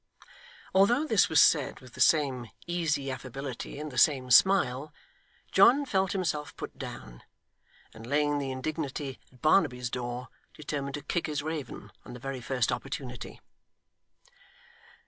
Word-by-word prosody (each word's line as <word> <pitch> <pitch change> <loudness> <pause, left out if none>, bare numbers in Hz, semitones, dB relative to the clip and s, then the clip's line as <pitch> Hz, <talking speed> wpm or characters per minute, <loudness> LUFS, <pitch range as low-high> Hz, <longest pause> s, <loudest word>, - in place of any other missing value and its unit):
Although 235 +10 +4
this 220 - +3
was 160 - +4
said 150 -4 +4
with 130 -2 -15
the - - -6
same 135 -7 +3 0.2
easy 155 -6 -1
affability, 130 +1 -6
and 150 0 -6
the 125 - -1
same 130 -3 +3
smile, 145 -4 +4 0.6
John 280 +3 +6
felt 190 -6 0
himself 155 -6 -2
put - - -7
down, - - -9 0.7
and 110 +1 -11
laying 145 +1 +1
the 140 -1 -3
indignity 140 0 -4
at 125 - -22
Barnaby's 125 -7 +2
door, 120 0 -4 0.3
determined 140 -2 -4
to 145 - -7
kick 170 +3 -2
his 150 -2 -3
raven, 155 -5 -6
on 120 - -10
the 125 - -9
very 135 0 -5
first 125 -1 0
opportunity. 130 -3 -6
140 Hz, 140 wpm, -29 LUFS, 125-155 Hz, 0.7 s, John